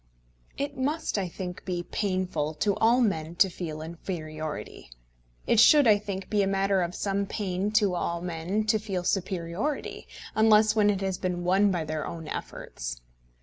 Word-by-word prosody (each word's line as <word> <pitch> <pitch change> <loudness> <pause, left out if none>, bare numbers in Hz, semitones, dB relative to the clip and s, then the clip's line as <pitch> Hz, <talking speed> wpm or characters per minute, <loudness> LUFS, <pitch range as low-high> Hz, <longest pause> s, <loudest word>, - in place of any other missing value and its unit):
It 280 0 -3
must, 280 -3 -1
I 190 - -1
think, 180 +1 -7
be 175 -2 -3
painful 185 -7 -2
to 200 +5 +1
all 235 +3 +4
men 165 -7 0
to 190 +1 +4
feel 155 -3 -5
inferiority. 155 - -6 0.6
It 225 - +3
should, 290 +5 +7
I 210 -3 +6
think, 195 -2 -5
be 210 -1 +1
a 195 - +2
matter 195 0 +2
of 175 0 -2
some 200 0 -1
pain 195 -1 -2
to 210 -4 +3
all 170 -1 -1
men 175 +4 -2
to 215 0 +2
feel 195 -4 -3
superiority, 190 - -2 0.3
unless 215 0 +5
when 210 -1 +4
it 200 -2 0
has 190 -2 -2
been 180 -1 -2
won 190 +3 +4
by 175 -4 -1
their 155 0 -3
own 165 -2 -7
efforts. - - -6
190 Hz, 170 wpm, -27 LUFS, 170-210 Hz, 0.6 s, should